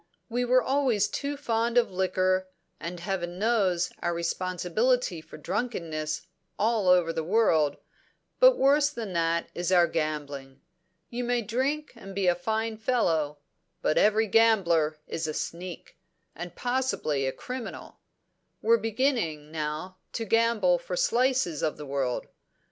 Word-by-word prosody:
We 245 +1 0
were 255 +1 +4
always 260 -7 +2
too 280 +6 -3
fond 230 -2 0
of 240 -4 +3
liquor, 185 0 +1 0.3
and 170 +3 -6
Heaven 175 -1 -3
knows 195 -5 +1
our 175 0 -1
responsibility 185 +4 0
for 155 - -12
drunkenness 160 -5 -3 0.3
all 220 -2 +1
over 180 -2 +4
the 160 - -2
world; 165 -6 +3 0.6
but - - +7
worse 285 +1 +4
than 225 -9 -6
that 170 0 0
is 175 +1 -2
our 175 -2 +6
gambling. 145 -4 -4 0.5
You 245 +1 -3
may 245 -1 0
drink 270 +7 -1
and 195 -4 -10
be 195 -1 0
a 175 - +5
fine 220 +5 -2
fellow; 165 - +1 0.5
but 155 - +3
every 215 +1 +4
gambler 185 -9 +3
is 160 -1 -3
a 155 - -3
sneak, 175 0 -6 0.3
and 175 +2 -8
possibly 245 - -1
a - - 0
criminal. 250 - -7 0.6
We're 230 +1 +5
beginning, 220 - -1
now, 155 +4 -4 0.2
to 225 - -3
gamble 220 -5 +3
for 180 +1 -5
slices 245 - +1
of 155 - -1
the 150 - -7
world. 135 -3 -2
185 Hz, 140 wpm, -27 LUFS, 165-235 Hz, 0.6 s, but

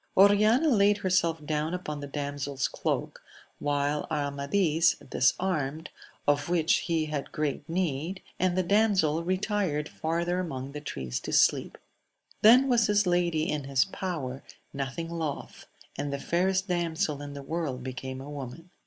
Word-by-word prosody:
Oriana 215 +9 +5
laid 205 -4 +4
herself 170 -5 +1
down 155 +3 -1
upon 150 -5 -5
the 145 - -6
damsePs 140 -1 -2
cloak, - - -2 0.4
while 145 0 0
Amadis 150 +3 +1
disarmed, 160 -4 0 0.4
of 145 +2 +2
which 165 -2 +3
he 165 -2 0
had 150 -2 -4
great 150 -1 -3
need, 170 +1 -2 0.2
and 185 -1 +1
the 185 - +3
damsel 185 -5 +2
retired 185 -4 0
far 165 +2 -2
ther 175 +1 0
among 135 -7 -4
the 150 +1 -7
trees 65 - -4
to - - -6
sleep. - - +3 0.6
Then 250 +5 +7
was 235 -4 +3
his 205 -1 +3
lady 175 -3 +1
in 150 -2 -2
his 135 -1 +2
power, 155 -9 -4 0.3
nothing 140 +4 -4
loth; 165 -4 -5 0.3
and 145 0 -3
the 140 - -2
fairest 190 +6 0
damsel 165 -5 -1
in 145 0 -7
the 140 -1 -7
world 140 -4 -3
became 130 +1 -5
a 135 - -9
woman. 145 +5 -8
160 Hz, 150 wpm, -28 LUFS, 145-185 Hz, 0.6 s, Then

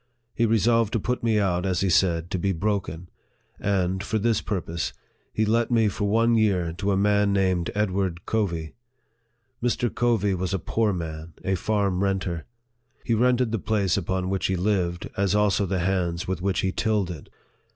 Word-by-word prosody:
He 115 - +1
resolved 115 0 +2
to 115 - +1
put 125 +5 -2
me 115 -2 +2
out, 90 -4 +1
as 95 -2 0
he 95 - +1
said, 85 -1 +2
to 95 - -1
be 95 +2 0
broken; 90 -3 -2 0.5
and, 95 -1 0
for 110 - -1
this 110 0 +1
purpose, 85 -5 -3 0.4
he 110 - 0
let 115 +2 +1
me 115 -3 +3
for 105 +1 -3
one 115 +2 +3
year 95 -7 +2
to 100 +1 0
a 95 - +2
man 105 0 +3
named 95 -3 +1
Ed 105 -2 +1
ward 90 -2 -2
Covey. 85 -8 -1 0.9
Mr. 120 -1 0
Covey 115 -5 +1
was 95 +1 -1
a - - +1
poor 110 +4 0
man, 80 -2 -5
a 95 - +1
farm 100 -1 0
renter. 95 -4 -1 0.6
He 115 - +1
rented 125 +1 +2
the 115 - -1
place 100 -4 +1
upon 95 0 -1
which 95 -1 0
he 95 - 0
lived, 90 -2 0
as 100 0 +1
also 105 -1 +2
the 95 -1 -1
hands 90 -2 -1
with 95 -2 -2
which 95 0 0
he 95 - 0
tilled 105 -3 0
it. 80 -4 -9
95 Hz, 185 wpm, -25 LUFS, 90-110 Hz, 0.9 s, me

